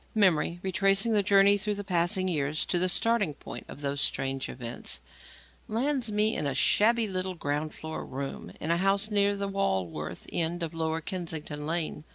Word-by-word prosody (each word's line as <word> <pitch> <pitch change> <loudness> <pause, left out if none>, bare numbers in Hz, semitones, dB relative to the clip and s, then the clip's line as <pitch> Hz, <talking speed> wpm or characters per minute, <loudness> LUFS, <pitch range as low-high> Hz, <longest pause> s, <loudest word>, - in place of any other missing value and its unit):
Memory, 175 -4 +3
retracing 195 +3 +2
the 210 -2 +4
journey 200 0 +5
through 210 +1 -1
the 205 - -5
passing 185 +1 +1
years 150 -3 0
to 175 - +1
the 185 +1 +3
starting 205 -5 +2
point - - -9
of 145 - -10
those 140 0 -1
strange 135 -2 -1
events, 120 -1 -3 0.7
lands 250 +1 0
me 210 +1 +2
in 145 - -1
a 135 - -2
shabby 225 +8 +4
little 185 -1 -2
ground 150 -1 -2
floor 160 0 -6
room 135 +1 -6
in 160 - -2
a 170 - +3
house 195 +3 +2
near 205 0 +3
the 200 0 -2
Walworth 95 - -2
end 170 +1 -1
of 165 - -4
Lower 160 0 -1
Kennington 160 -4 -5
Lane. 160 -2 -2
180 Hz, 180 wpm, -28 LUFS, 155-200 Hz, 0.7 s, journey